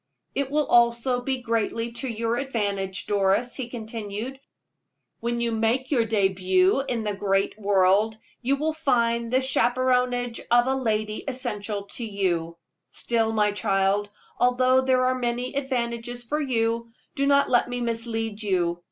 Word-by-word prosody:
"It 280 -1 -1
will 300 +1 +1
also 240 +1 +3
be 260 0 -3
greatly 230 0 -1
to 250 +3 -5
your 230 0 -1
advantage, 200 -7 -2
Doris," 205 +4 +1
he 250 -3 -4
continued. 225 +2 -6 0.8
"When 235 +1 -2
you 235 0 0
make 225 +4 0
your 240 -5 +3
debut 190 -1 +2
in 230 -3 -1
the 210 -1 -1
great 195 0 0
world, 200 +2 +3 0.2
you 265 +3 +2
will 310 +3 -1
find 235 -6 +1
the 260 +1 +3
chaperonage 250 -2 +1
of 240 0 +5
a 265 - +1
lady 215 -4 -1
essential 220 -6 -3
to 200 +4 -6
you. 175 -6 -1 0.3
Still, 225 -2 0
my 210 -1 +2
child, 205 -1 +1 0.3
although 255 +1 +4
there 260 -1 +2
are 255 0 +1
many 245 +1 -2
advantages 240 -3 -2
for 300 +6 -2
you, 230 -3 -1 0.2
do 275 0 0
not 280 0 +3
let 245 -1 +3
me 245 0 -3
mislead 230 -2 -2
you. 175 -4 0
235 Hz, 150 wpm, -25 LUFS, 210-250 Hz, 0.8 s, of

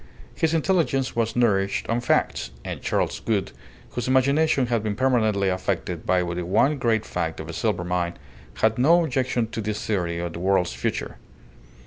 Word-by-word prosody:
His 160 0 +1
intelligence 160 -6 +1
was 115 -1 0
nourished 100 -5 +1
on 115 +1 0
facts; 120 - +1 0.2
and - - -5
Charles - - -1
Gould, 105 -4 -1 0.4
whose 120 - -3
imagination 140 +2 +3
had 120 -2 0
been 105 -1 -2
permanently 110 -5 +2
affected 95 0 -2
by 90 -1 +3
the 85 0 -3
one 110 - +2
great 115 -3 +1
fact - - -3
of - - -6
a - - -6
silver 85 - -1
mine, 90 -1 -2 0.4
had 110 +1 +1
no 170 +7 +5
objection 130 -4 0
to 115 - -4
this 105 0 -3
theory 90 -5 -1
of 85 -1 -4
the - - -6
world's 95 -1 +1
future. - - -3
110 Hz, 170 wpm, -24 LUFS, 95-130 Hz, 0.4 s, no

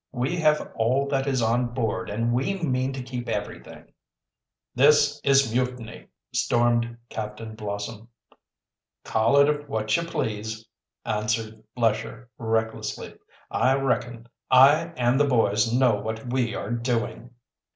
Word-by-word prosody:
"We 130 +7 -2
have 155 -2 +1
all 130 +5 +1
that 135 0 0
is 130 -3 +1
on 120 +1 0
board, 110 -7 -2
and 115 +3 -1
we 135 +11 0
mean 130 -5 0
to 130 -1 -5
keep 125 -1 -6
everything." - - -6 0.8
"This 145 +2 +4
is 135 -4 +3
mutiny!" 125 -2 -3 0.3
stormed 120 -1 +1
Captain 110 0 -6
Blossom. 105 +1 -6 1.0
"Call 110 +5 +2
it 145 0 +3
what 110 -3 0
you - - +1
please," 110 -9 -4 0.4
answered 110 0 -2
Lesher 115 +1 -1
recklessly. 110 - -2 0.4
"I 130 - +2
reckon 120 -3 -2 0.2
I 140 +5 +6
and 125 +2 +2
the 145 - +3
boys 115 -3 +2
know 125 -3 +3
what 110 +3 -5
we 120 -4 0
are 100 - -5
doing!" 120 0 -3
120 Hz, 130 wpm, -25 LUFS, 110-135 Hz, 1.0 s, I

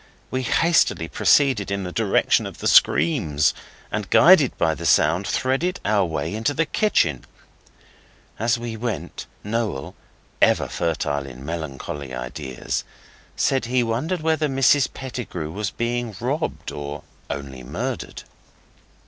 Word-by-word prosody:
We 130 - -1
hastily 150 - +2
proceeded 130 - +3
in 100 -1 -2
the 90 - -5
direction 105 0 +2
of - - -10
the - - -2
screams, 80 - +4 0.4
and, - - -3
guided - - +6
by 80 -1 +2
the 85 +1 -4
sound, 85 +5 +3
threaded 155 +8 0
our 100 -1 +3
way 80 +1 -3
into 115 +7 -1
the 165 - +2
kitchen. 110 - +1 1.2
As 115 +2 +2
we 120 -1 -5
went, 115 0 -5 0.2
Noel, 105 -10 -2 0.5
ever - - +4
fertile 70 -4 -2
in 65 +1 -10
melancholy 75 -4 -5
ideas, 60 +1 -4 0.5
said 130 - +1
he 125 +1 +1
wondered 150 +10 -1
whether 160 -1 +1
Mrs 135 0 +3
Pettigrew 115 - -6
was 105 +4 -3
being 120 -2 -3
robbed, 140 +7 -2
or 75 0 -6 0.3
only 70 -2 -6
murdered. - - -5
105 Hz, 130 wpm, -23 LUFS, -, 1.2 s, guided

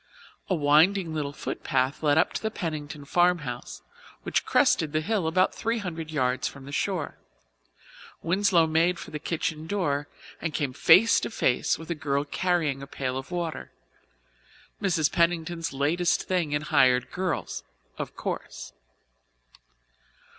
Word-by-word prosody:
A 185 - +2
winding 160 +4 +3
little 145 -2 -2
footpath 135 -1 -2
led 145 -1 +3
up 160 - +3
to - - -3
the 220 - -1
Pennington 150 -7 -5
farmhouse, 165 -7 0 0.4
which - - -1
crested 155 -2 +3
the 155 - +1
hill 200 -1 0
about 185 +3 +2
three 230 +1 -1
hundred 165 -6 -5
yards 130 -4 0
from 140 -1 -9
the 140 - -9
shore. 180 +2 -2 1.0
Winslow 180 -1 +3
made 165 +3 +2
for - - -9
the 150 - -4
kitchen 160 0 -3
door 150 -7 -1 0.3
and 165 -3 -3
came 140 -4 -1
face 175 - +6
to - - -3
face 130 - +1
with 165 +2 -8
a - - +2
girl 140 -2 -1
carrying 160 -4 0
a 140 - -8
pail 130 -2 -3
of 135 +1 -5
water 175 -2 -4 1.1
Mrs. 165 -7 +2
Pennington's 170 0 0
latest 150 +6 +1
thing 180 -5 -1
in 145 +1 0
hired 125 -4 +3
girls, 180 -3 -3 0.4
of - - -5
course. - - -5
160 Hz, 145 wpm, -27 LUFS, 145-175 Hz, 1.1 s, face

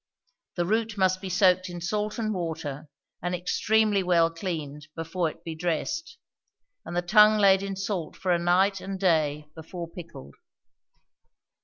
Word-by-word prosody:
The 175 - 0
root 220 +2 0
must 185 -1 +2
be 190 - -5
soaked 185 -1 +3
in 175 0 -6
salt 210 +5 -2
and 215 -2 -1
water, 160 -5 -5 0.3
and 180 +2 -1
extremely 210 +3 +2
well 170 -2 +3
cleaned 155 -4 -5
before 165 +1 -2
it - - -14
be 165 - -5
dressed; 175 - -3 0.7
and 175 +1 -5
the 175 - +1
tongue 210 +3 +6
laid 195 -2 +5
in 195 0 -4
salt 190 -4 -3
for 185 - -2
a 175 - +3
night 185 +3 +2
and 195 0 -5
day 155 -5 +1
before 170 +2 -7
pickled. 165 - -11
180 Hz, 155 wpm, -26 LUFS, 165-195 Hz, 0.7 s, tongue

